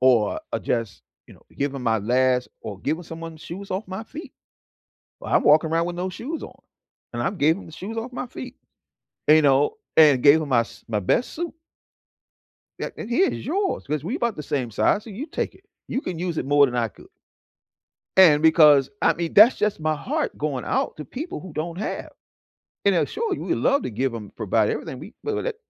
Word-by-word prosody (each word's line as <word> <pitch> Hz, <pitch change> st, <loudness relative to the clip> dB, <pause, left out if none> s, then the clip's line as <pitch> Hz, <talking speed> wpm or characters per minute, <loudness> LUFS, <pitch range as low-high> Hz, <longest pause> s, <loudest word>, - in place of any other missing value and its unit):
or, 125 Hz, -5 st, +3 dB
uh, -, -, 0 dB
just, 115 Hz, -5 st, -3 dB, 0.2 s
you -, -, -15 dB
know, -, -, -21 dB
giving 140 Hz, -2 st, -2 dB
my 110 Hz, -2 st, +2 dB
last 125 Hz, +3 st, +2 dB
or 100 Hz, -2 st, -7 dB
giving 160 Hz, +5 st, -2 dB
someone 165 Hz, 0 st, -8 dB
shoes 180 Hz, +5 st, -9 dB
off 190 Hz, +3 st, -3 dB
my 190 Hz, +4 st, -6 dB
feet. 300 Hz, +8 st, -10 dB, 0.9 s
Well, -, -, -5 dB
I'm -, -, +4 dB
walking 155 Hz, +2 st, +5 dB
around 165 Hz, +1 st, +1 dB
with 175 Hz, -, -4 dB
no 180 Hz, +2 st, -2 dB
shoes 275 Hz, -, -6 dB
on, -, -, -11 dB, 0.5 s
and 120 Hz, -, -2 dB
I've 190 Hz, +10 st, -2 dB
gave 160 Hz, +3 st, +3 dB
'em -, -, -10 dB
the 160 Hz, -, -12 dB
shoes 215 Hz, +8 st, -7 dB
off 240 Hz, +3 st, -4 dB
my 250 Hz, -, -4 dB
feet, 255 Hz, +1 st, -9 dB, 0.7 s
you 155 Hz, +1 st, +7 dB
know, 140 Hz, -, +3 dB, 0.2 s
and 145 Hz, -5 st, +7 dB
gave 150 Hz, +3 st, +6 dB
'em 145 Hz, -, -5 dB
my 120 Hz, -3 st, +4 dB
s 115 Hz, -, -10 dB
my 110 Hz, -3 st, -1 dB
best 235 Hz, -, +1 dB
suit 340 Hz, +1 st, -4 dB, 1.3 s
a -, -, -3 dB
and, 215 Hz, -, -6 dB
"Here's 370 Hz, +10 st, +1 dB
yours 380 Hz, +6 st, -1 dB
'cause 150 Hz, 0 st, -2 dB
we 230 Hz, -, -2 dB
about 235 Hz, -5 st, -1 dB
the 150 Hz, -, -5 dB
same 130 Hz, -5 st, -2 dB
size, 200 Hz, -, +1 dB
so 225 Hz, -, -10 dB
you 245 Hz, +10 st, -6 dB
take 330 Hz, -, -3 dB
it. 390 Hz, -, -21 dB, 0.2 s
You 265 Hz, -, -1 dB
can 175 Hz, -, -5 dB
use 175 Hz, -2 st, -2 dB
it -, -, -2 dB
more 145 Hz, 0 st, +5 dB
than 125 Hz, -, -5 dB
I 115 Hz, -2 st, +1 dB
could." -, -, -17 dB, 1.1 s
And 160 Hz, -5 st, +7 dB
because, 150 Hz, -4 st, +6 dB
I -, -, +5 dB
mean, 170 Hz, -1 st, -4 dB
that's 220 Hz, +5 st, +8 dB
just 210 Hz, -5 st, 0 dB
my 155 Hz, 0 st, +1 dB
heart 300 Hz, -, -2 dB
going 145 Hz, -4 st, -2 dB
out -, -, -1 dB
to 150 Hz, -, -7 dB
people 330 Hz, -, -6 dB
who 185 Hz, -4 st, -10 dB
don't 170 Hz, +3 st, -4 dB
have. 215 Hz, -, -4 dB, 0.8 s
And, 200 Hz, -, +4 dB
now 175 Hz, -, +2 dB
sure, 445 Hz, -4 st, -2 dB
we -, -, -2 dB
love 280 Hz, +1 st, +2 dB
to -, -, -3 dB
give 125 Hz, +3 st, -1 dB
'em 105 Hz, -3 st, -7 dB
provide 110 Hz, 0 st, +1 dB
everything. 130 Hz, -, -4 dB
We 210 Hz, -, -11 dB
well, 435 Hz, -1 st, -2 dB
let -, -, -3 dB
160 Hz, 215 wpm, -24 LUFS, 135-215 Hz, 1.3 s, that's